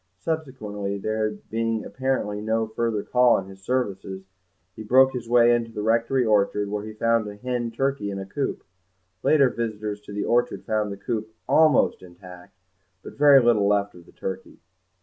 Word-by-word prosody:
Subsequently, 105 -7 -4
there 110 +2 -1
being 115 +1 -3
apparently 130 -6 -2
no 110 +1 0
further 110 -1 -2
call 125 -1 +4
on 95 - -3
his 95 0 -13
services, 95 -5 -3 0.5
he - - -9
broke 130 +4 +4
his 120 -2 -6
way 120 0 +5
into 115 -1 -1
the 105 - -5
rectory 115 +3 +2
orchard, 105 -1 +1
where 105 0 -3
he 110 - -7
found 115 0 +1
a 105 - -7
hen 120 +1 -3
turkey 135 -2 -2
in 100 - -4
a 95 - -5
coop; 135 +8 -3 0.6
later 140 -3 +4
visitors 110 -3 -4
to 105 - -12
the 100 0 -3
orchard 120 +1 0
found 105 -1 -1
the 100 - -6
coop 110 +1 -4
almost 155 -4 +4
intact, 90 +1 -14 0.5
but - - -9
very 145 -1 +7
little 110 -4 +3
left 100 0 +1
of 85 -1 -16
the - - -17
turkey. 95 - -7
110 Hz, 175 wpm, -24 LUFS, 100-120 Hz, 0.6 s, very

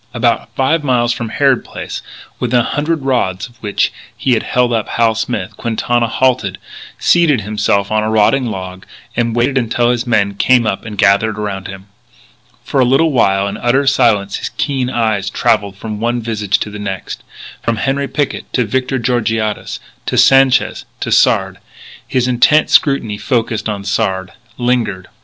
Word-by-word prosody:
About - - +1
five 150 +4 +1
miles 120 -3 +2
from 115 -2 -5
Harrod 135 +2 +2
Place, - - -7 0.4
within 125 0 +2
a - - -1
hundred 150 +3 -1
rods 120 -9 0
of 120 -1 -22
which 105 -2 0 0.2
he 130 - 0
had 115 - +1
held 125 -1 +1
up 110 -2 -1
Hal 115 -1 +2
Smith, 110 -4 -3
Quintana 120 +1 0
halted, 120 -6 0 0.4
seated 160 -8 +3
himself 100 -1 0
on 110 0 +2
a 110 - -1
rotting 110 +4 +2
log, 95 -3 -6 0.3
and 115 -1 0
waited 130 +3 +2
until 120 0 +1
his 120 +1 -2
men 100 -4 +2
came 120 +4 +3
up 105 -1 -2
and 105 -2 -7
gathered 105 +2 +3
around 100 -3 -4
him. 95 -1 -9 0.8
For 140 - -1
a - - +5
little 135 +6 +3
while, 100 -6 +2
in 100 - -4
utter 135 +4 +1
silence, 115 -8 +2
his 120 - -4
keen 130 0 -2
eyes 110 -5 0
travelled 105 -4 0
from 105 0 -6
one 120 +2 0
visage 105 -3 -1
to 105 - -3
the 105 - -7
next, 95 -2 -5 0.4
from 115 -1 -1
Henri 135 +5 -1
Picquet 140 +1 -2
to 125 - +1
Victor 130 +4 -1
Georgiades, 115 -3 -1 0.3
to - - -1
Sanchez, 135 -1 +4 0.2
to - - -3
Sard. 95 0 +2 0.5
His 125 -1 0
intent 130 +5 +3
scrutiny 115 -8 +2
focussed 115 -4 -1
on 100 -2 -4
Sard; 95 -2 -1 0.3
lingered. 120 -7 -1
115 Hz, 170 wpm, -15 LUFS, 105-130 Hz, 0.8 s, a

